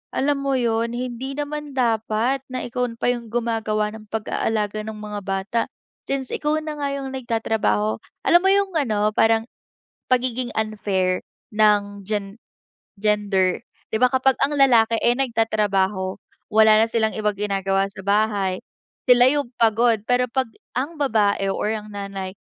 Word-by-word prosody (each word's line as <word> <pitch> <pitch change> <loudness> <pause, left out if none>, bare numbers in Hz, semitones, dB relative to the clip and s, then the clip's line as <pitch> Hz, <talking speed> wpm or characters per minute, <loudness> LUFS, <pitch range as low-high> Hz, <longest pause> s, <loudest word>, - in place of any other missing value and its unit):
alam 280 +1 +1
mo 275 -1 +1
yun, 230 -1 0
hindi 255 +2 -4
naman 295 0 -4
dapat 230 +1 +1
na 255 - -3
ikaw 250 +1 -2 0.2
pa 245 - +2
yung 235 -1 -8
gumagawa 220 -3 -1
ng 215 -1 -12
pag-aalaga 215 -1 -1
ng 220 0 -6
mga 210 -1 -6
bata, 195 +4 -1 0.5
since 270 -2 -2
ikaw 300 +1 0
na 310 -1 -5
nga 285 -1 -1
yung 270 -1 -5
nagtatrabaho. 220 - 0 0.3
Alam 345 - +6
mo 385 - +4
yung 395 0 +2
ano? 215 -7 +1
Parang 225 0 +3 0.7
pagiging 250 -1 +1
unfair 200 -4 0 0.3
ng 205 -2 +2 0.9
gender, 200 -3 +1 0.3
'di - - 0
ba, 250 - +7
kapag 260 0 +3
ang 290 +1 -1
lalaki 235 -5 +5
ay 240 - +3
nagtatrabaho, 210 -6 0 0.3
wala 220 0 +6
na - - -1
silang 220 -1 +1
ibang 210 -1 0
ginagawa 195 -1 0
sa 195 -1 -10
bahay, 200 -3 +1 0.5
sila 245 0 +7
yung 285 -3 -1
pagod. 230 0 +3
Pero 250 0 +3
pag 260 +1 0 0.3
ang 285 +6 -2
babae 210 -7 +2
o - - -4
ang 215 0 -3
nanay 195 -1 -6
225 Hz, 145 wpm, -22 LUFS, 205-255 Hz, 0.9 s, ba